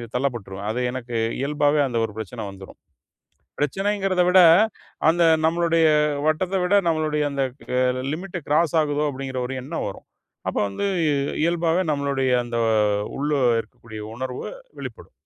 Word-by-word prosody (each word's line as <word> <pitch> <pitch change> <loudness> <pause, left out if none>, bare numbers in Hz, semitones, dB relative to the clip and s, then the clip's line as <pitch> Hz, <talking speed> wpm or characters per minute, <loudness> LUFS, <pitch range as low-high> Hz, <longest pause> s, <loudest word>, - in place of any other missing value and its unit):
தள்ளப்பட்ருவேன். 110 -7 -3
அது 120 - -3
எனக்கு 120 -2 -4 0.2
இயல்பாவே 145 +1 +2
அந்த 120 -3 -2
ஒரு 110 - -7
பிரச்சனை 110 -4 -6
வந்துரும். 95 -1 -12 0.8
பிரச்சனைங்கிறத 195 +4 0
விட, 185 +1 +6 0.7
அந்த 170 +2 +3 0.2
நம்மளுடைய 165 0 +3 0.4
வட்டத்த 180 +5 +1
விட, 180 +3 +2
நம்மளுடைய 155 -2 0
அந்த 140 -1 -1 0.4
அ - - +3 0.3
லிமிட் 180 +2 -6
கிராஸ் 155 +3 +2
ஆகுதோ? 145 0 -1
அப்டின்கிற 130 -1 -5
ஒரு 135 - -4
எண்ணம் 150 +6 -4
வரும். 100 - -10 0.4
அப்ப - - -1
வந்து 100 - -3 0.6
இயல்பாவே 170 +1 +1
நம்மளுமுடைய 140 -2 0
அந்த 120 0 -3 0.6
உள்ள 145 +2 -1 0.3
இருக்கக்கூடிய 110 -1 -11
உணர்வு 125 +1 -5 0.3
வெளிப்படும். - - -9
145 Hz, 130 wpm, -23 LUFS, 125-170 Hz, 0.8 s, விட